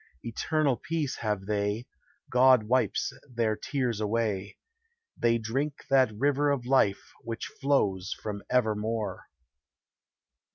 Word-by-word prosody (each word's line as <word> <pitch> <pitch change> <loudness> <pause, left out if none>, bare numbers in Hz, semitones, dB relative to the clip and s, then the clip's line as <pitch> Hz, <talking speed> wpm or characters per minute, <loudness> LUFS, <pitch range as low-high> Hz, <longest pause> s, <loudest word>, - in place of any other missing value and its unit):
Eternal 140 +3 0
peace 155 -4 -2
have 105 -4 -2
they; 105 +2 -1 0.5
God 125 -1 +6
wipes 125 +4 +1 0.2
their 115 -3 0
tears 130 -3 -2
away: 105 -2 -1 0.6
They 115 0 +2
drink 135 +6 -3
that 130 -4 +5
river 145 +3 +2
of 140 -4 0
life 125 -7 +2
which 115 0 -4
flows 100 -10 0
from 105 -1 -5
Evermore. 110 -4 0
115 Hz, 110 wpm, -28 LUFS, 105-130 Hz, 0.6 s, God